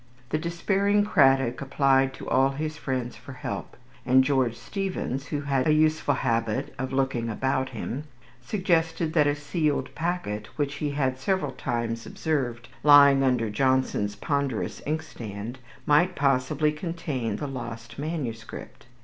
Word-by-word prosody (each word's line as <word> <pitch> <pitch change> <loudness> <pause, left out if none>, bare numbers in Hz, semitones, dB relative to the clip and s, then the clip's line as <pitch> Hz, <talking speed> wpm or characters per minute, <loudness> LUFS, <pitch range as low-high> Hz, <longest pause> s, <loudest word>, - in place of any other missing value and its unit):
The 155 - 0
despairing 195 +5 +1
Cradock 135 - +3
applied 135 -1 +3
to - - -9
all 135 +1 +4
his 155 +3 -4
friends 130 -5 -3
for - - -11
help; - - -6 0.3
and 130 +1 +5
George 130 -4 +1
Steevens, 180 -9 -3
who 145 - -2
had 140 -1 0
a 155 - +5
useful 155 -2 +2
habit 115 -4 -1
of 130 0 -3
looking 130 -3 0
about 130 +3 0
him, 130 +4 -5 0.4
suggested 165 - 0
that 150 -3 +4
a 145 - +2
sealed 145 +1 -1
packet, 160 -12 -3
which 145 -1 0
he 150 0 -1
had 135 -2 -1
several 190 +7 0
times 115 -2 -3
observed 125 -7 -2
lying 140 -2 +7
under 125 -5 +1
Johnson's 130 -4 +1
ponderous 140 0 -2
inkstand, 120 -7 -5 0.3
might 175 +5 +4
possibly 140 +2 +2
contain 150 - -3
the 145 - -4
lost 120 -3 -7
manuscript. 125 -8 -5
135 Hz, 140 wpm, -26 LUFS, 125-155 Hz, 0.4 s, lying